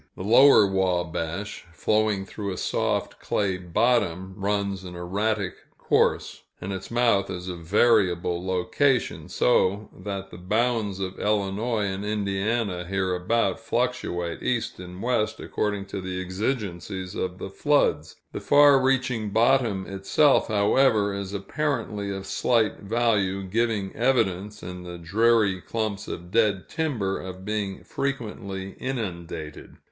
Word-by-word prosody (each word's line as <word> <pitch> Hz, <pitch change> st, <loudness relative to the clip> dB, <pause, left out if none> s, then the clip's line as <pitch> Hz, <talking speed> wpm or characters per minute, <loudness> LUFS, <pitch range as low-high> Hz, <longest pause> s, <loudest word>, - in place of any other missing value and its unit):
The -, -, -5 dB
Lower 120 Hz, +2 st, +7 dB
Wabash, 95 Hz, 0 st, -1 dB
flowing 105 Hz, +3 st, +1 dB
through 100 Hz, 0 st, -5 dB
a 90 Hz, -, -5 dB
soft -, -, -1 dB
clay 95 Hz, -3 st, 0 dB
bottom, 95 Hz, 0 st, 0 dB
runs 100 Hz, -1 st, -1 dB
an 90 Hz, -1 st, -8 dB
erratic 100 Hz, +2 st, -1 dB, 0.2 s
course, -, -, +1 dB, 0.2 s
and 100 Hz, +2 st, -4 dB
its 95 Hz, 0 st, -6 dB
mouth 115 Hz, -4 st, +2 dB
is 90 Hz, 0 st, -5 dB
a 90 Hz, -, -4 dB
variable 90 Hz, -1 st, +2 dB
location, 95 Hz, +9 st, 0 dB
so 100 Hz, +11 st, +2 dB
that 95 Hz, 0 st, -6 dB
the 85 Hz, -, -10 dB
bounds 110 Hz, +1 st, 0 dB
of 95 Hz, -1 st, -4 dB
Illinois 105 Hz, +2 st, 0 dB
and 95 Hz, 0 st, -3 dB
Indiana, 105 Hz, -1 st, -1 dB
hereabout, 95 Hz, +2 st, 0 dB
fluctuate 85 Hz, -1 st, -2 dB
east 120 Hz, -6 st, -1 dB
and 90 Hz, +2 st, -8 dB
west 120 Hz, -3 st, 0 dB
according 105 Hz, -2 st, -2 dB
to 100 Hz, 0 st, -5 dB
the 95 Hz, 0 st, -4 dB
exigencies 95 Hz, -2 st, -3 dB
of 90 Hz, 0 st, -3 dB
the 95 Hz, -, -7 dB
floods. 95 Hz, -, +1 dB, 0.2 s
The -, -, -5 dB
far 145 Hz, -2 st, +6 dB
reaching 125 Hz, -4 st, +1 dB
bottom 115 Hz, -3 st, +2 dB
itself, 100 Hz, +9 st, +3 dB
however, 105 Hz, 0 st, +3 dB
is 100 Hz, -1 st, -4 dB
apparently 105 Hz, -1 st, -2 dB
of 95 Hz, 0 st, -4 dB
slight 115 Hz, +1 st, +1 dB
value, 100 Hz, -3 st, +1 dB
giving 105 Hz, 0 st, -1 dB
evidence, 105 Hz, -5 st, 0 dB
in 90 Hz, 0 st, -7 dB
the 90 Hz, -1 st, -8 dB
dreary 100 Hz, +2 st, +2 dB
clumps 110 Hz, -2 st, -3 dB
of 90 Hz, +1 st, -7 dB
dead 105 Hz, -4 st, +2 dB
timber, 120 Hz, -12 st, -1 dB
of 95 Hz, 0 st, -8 dB
being 105 Hz, -2 st, -3 dB
frequently 105 Hz, -8 st, -4 dB
inundated. 85 Hz, -, -5 dB
100 Hz, 130 wpm, -25 LUFS, 95-115 Hz, 0.2 s, Lower